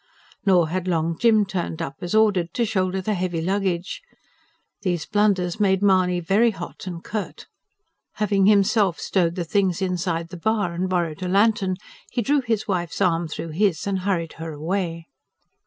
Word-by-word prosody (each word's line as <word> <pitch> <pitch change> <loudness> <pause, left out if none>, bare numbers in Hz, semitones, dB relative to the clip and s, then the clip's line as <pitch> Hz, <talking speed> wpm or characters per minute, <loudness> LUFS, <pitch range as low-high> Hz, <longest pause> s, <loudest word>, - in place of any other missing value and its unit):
Nor 175 -4 +4
had 185 +2 -2
Long 165 -1 0
Jim 220 0 +4
turned 180 -4 -4
up 135 - -5
as 175 +4 -2
ordered, 195 -6 +2
to 240 - +2
shoulder 190 -3 0
the 215 +3 -1
heavy 180 -3 -2
luggage. 190 - -1 0.8
These 175 -5 -1
blunders 205 -4 +1
made 195 -1 +2
Mahony 185 -2 +3
very 195 +7 +3
hot 195 -2 -8
and 175 -2 -6
curt. 215 -2 -5 0.7
Having 200 -2 +2
himself 200 -3 +3
stowed 175 -3 0
the 175 - -3
things 185 -1 +1
inside 180 -3 -2
the 180 - -8
bar 205 -1 0
and 185 +2 -2
borrowed 170 -3 -1
a 185 - -2
lantern, 200 0 +2 0.4
he 240 - -1
drew 285 +4 +2
his 225 -4 -1
wife's 175 -4 -2
arm 170 -3 +2
through 165 +1 -6
his, 175 0 0
and 195 -1 -1
hurried 180 -4 -1
her 165 0 -4
away. 165 +1 -3
185 Hz, 170 wpm, -23 LUFS, 170-205 Hz, 0.8 s, Nor